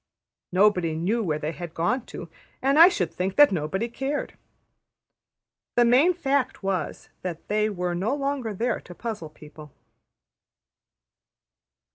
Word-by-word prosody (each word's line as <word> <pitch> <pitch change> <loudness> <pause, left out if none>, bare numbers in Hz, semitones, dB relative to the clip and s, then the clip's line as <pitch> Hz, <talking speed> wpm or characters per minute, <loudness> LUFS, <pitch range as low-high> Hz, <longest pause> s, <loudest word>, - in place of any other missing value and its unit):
Nobody 180 -4 +3
knew 195 +9 0
where 155 -6 -1
they 150 +1 -3
had 165 +1 -8
gone 220 +10 -1
to, 170 - -8 0.3
and 275 +3 +2
I 335 - +11
should 180 - -2
think 185 +1 -2
that 290 -4 +7
nobody 185 +6 -1
cared. 270 +4 -4 1.4
The 240 - +5
main 275 +10 +4
fact 280 - -1
was 190 -3 -3
that 175 -3 -6
they 215 +1 +1
were 180 -3 -2
no 200 +10 -1
longer 275 -5 -2
there 230 +4 -1
to 175 - -12
puzzle 215 -9 -5
people. 150 -1 -14
200 Hz, 135 wpm, -25 LUFS, 175-255 Hz, 1.4 s, I